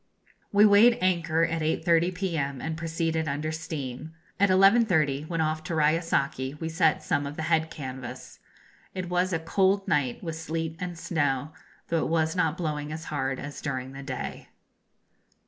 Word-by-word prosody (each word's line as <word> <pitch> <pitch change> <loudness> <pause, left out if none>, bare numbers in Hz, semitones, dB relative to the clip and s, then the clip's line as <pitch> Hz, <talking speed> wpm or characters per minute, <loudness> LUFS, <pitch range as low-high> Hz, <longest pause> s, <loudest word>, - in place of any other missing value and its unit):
We 205 +1 +6
weighed 215 +4 +6
anchor 170 -3 +1
at 165 -1 0
8.30 170 +3 +2
p.m. 155 -8 -2
and 160 +3 -3
proceeded 165 -1 -1
under 150 +2 -2
steam. 155 -2 -6 0.2
At 200 0 +4
11.30, 185 - +4
when 165 -1 -1
off 155 0 -1
Touraya 155 0 +2
saki, 140 -4 -1
we 160 +2 -4
set 160 -1 +2
some 145 0 0
of 145 - -7
the 160 - -4
head 160 0 +1
canvas. 130 -4 -8 0.6
It 185 -2 -4
was 180 +1 +1
a 165 - +1
cold 190 +4 +1
night, 130 0 0
with 165 -2 -4
sleet 160 0 -3
and 180 -1 -5
snow, 145 -4 -1 0.4
though 165 -1 +1
it - - -2
was 160 0 +1
not 165 -2 +1
blowing 150 -4 -3
as 160 +1 -5
hard 135 -2 -1
as 140 +2 -7
during 130 -3 -3
the 135 0 -8
day. 130 -2 -6
160 Hz, 165 wpm, -27 LUFS, 145-170 Hz, 0.6 s, We